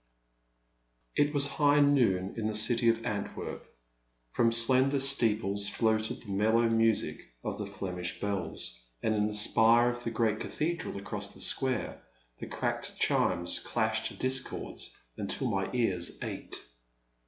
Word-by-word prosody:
IT 145 0 +2
was 145 -2 +3
high 145 0 +3
noon 120 -10 +2
in 110 -2 -2
the 110 - -2
city 115 +2 +4
of 115 0 0
Antwerp. 100 -1 -5 0.7
From 115 -1 +2
slender 130 +4 +4
steeples 110 -7 +3
floated 110 -1 0
the 105 - -9
mellow 110 +4 +2
music 115 -1 +1 0.2
of - - -4
the 105 - -4
Flemish 90 -3 -5
bells, 90 -11 -4 0.2
and 110 - +1
in 105 0 +1
the 105 - -3
spire 115 +3 +5
of 120 0 -6
the 115 - -2
great 110 -2 0
cathedral 165 -7 -3
across 100 - -5
the - - -13
square 130 -4 -1 0.4
the - - -7
cracked - - -3
chimes - - +1
clashed - - -2
discords 130 0 -3 0.3
until 105 +6 -3
my 95 -1 -1
ears 95 -9 +1
ached. - - -6
115 Hz, 140 wpm, -29 LUFS, 100-125 Hz, 0.7 s, spire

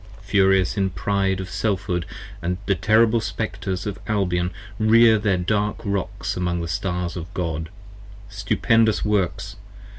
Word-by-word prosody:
Furious 95 -1 +3
in 95 -1 +1
pride 95 0 0
of 95 - -5
Selfhood 90 -4 -2 0.6
the 100 - +2
terrible 110 +4 +3
Spectres 100 -3 -3
of 100 -3 -4
Albion 90 -4 0 0.3
Rear 110 0 +6
their 100 -3 +1
dark 105 +3 0
Rocks 100 -2 -2
among 90 -1 -1
the 85 - -3
Stars 90 -1 -2
of 85 0 -7
God: 80 -3 -3 0.6
stupendous 110 +3 +2
50 105 - -1
Works! 95 -1 -1
95 Hz, 130 wpm, -23 LUFS, 90-105 Hz, 0.6 s, Rear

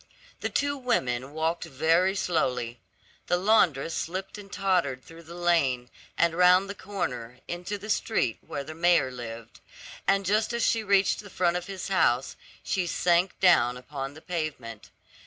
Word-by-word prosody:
The - - -2
two 285 0 0
women 130 - -1
walked 160 +3 -1
very 165 +6 +2
slowly. 125 -10 -1 0.5
The 175 - +2
laundress 175 -7 +3
slipped 190 +6 -4
and 200 -1 -12
tottered 180 -10 0
through 165 0 -13
the 170 +1 -11
lane, 140 -9 +1 0.3
and 170 -1 +3
round 180 +2 +5
the 200 - -5
corner, 125 - -5
into 180 +4 -4
the 205 +2 -10
street 165 - 0
where 140 - -5
the 155 +3 -8
mayor 170 -5 +3
lived; 115 -2 -8 0.5
and 195 +1 +3
just 215 +4 +1
as 235 - +1
she 225 -1 +1
reached 200 -1 +3
the 205 - -10
front 175 -2 +1
of 180 0 -3
his 195 -1 -6
house, 135 -9 +2 0.3
she 185 -3 -1
sank 175 +2 +1
down 125 -10 +4
upon 135 +2 -6
the 155 - -12
pavement. 150 -11 -5
170 Hz, 160 wpm, -27 LUFS, 135-190 Hz, 0.5 s, round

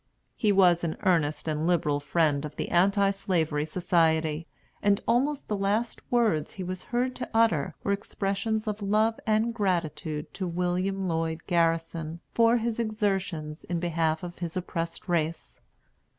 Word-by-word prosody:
He 210 - +2
was 180 -3 +5
an 165 -2 -2
earnest 165 -6 +1
and 155 +1 0
liberal 150 -5 +2
friend 150 -1 +1
of 150 -1 -6
the - - -3
Anti 195 +3 +3
Slavery 160 -6 -1
Society; 160 -2 +1 0.3
and 205 0 +3
almost 270 +5 +1
the 210 - -1
last 205 +4 -1
words 220 -11 +2
he 190 - -5
was 185 0 -4
heard 250 +1 0
to - - -5
utter 225 -11 +3
were 200 - 0
expressions 200 +2 -1
of 210 0 -3
love 215 +3 +2
and 220 +2 +2
gratitude 160 -7 -2
to 185 - -3
William 180 +2 -1
Lloyd 165 -1 -1
Garrison 165 -1 0
for 230 +1 +4
his 235 0 -2
exertions 195 -8 -2
in 175 -1 -2
behalf 165 -2 0
of 175 0 -7
his 170 0 -4
oppressed 170 -1 -4
race. 165 -2 -2
180 Hz, 150 wpm, -27 LUFS, 160-205 Hz, 0.3 s, was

